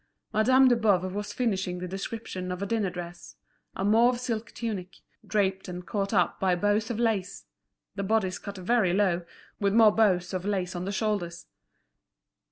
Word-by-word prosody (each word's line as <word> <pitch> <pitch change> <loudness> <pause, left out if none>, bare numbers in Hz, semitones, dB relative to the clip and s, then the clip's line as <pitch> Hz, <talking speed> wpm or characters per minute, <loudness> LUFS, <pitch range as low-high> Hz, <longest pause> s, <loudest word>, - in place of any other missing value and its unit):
Madame 255 +5 +5
de 245 - +5
Boves 190 -5 +1
was 205 +1 -4
finishing 195 -7 -1
the 180 0 -5
description 190 -1 -5
of 180 - -4
a - - -1
dinner 210 -2 0
dress; 175 -1 -8 0.4
a 190 - -2
mauve 235 +4 +4
silk 230 -2 -3
tunic—draped 195 -1 -3
and 180 0 -7
caught 200 0 -2
up 180 -5 +1
by 185 -2 +2
bows 205 +4 +1
of 235 - -2
lace; 200 -5 -1 0.5
the 200 - -4
bodice 195 -2 0
cut 200 -1 -8
very 190 -1 +2
low, 185 -3 +2 0.4
with 200 0 +1
more 225 -2 +7
bows 190 -5 +2
of 185 -1 -2
lace 190 -3 -2
on 175 +1 -3
the 195 - -2
shoulders. 190 -5 -2
200 Hz, 170 wpm, -27 LUFS, 180-220 Hz, 0.5 s, more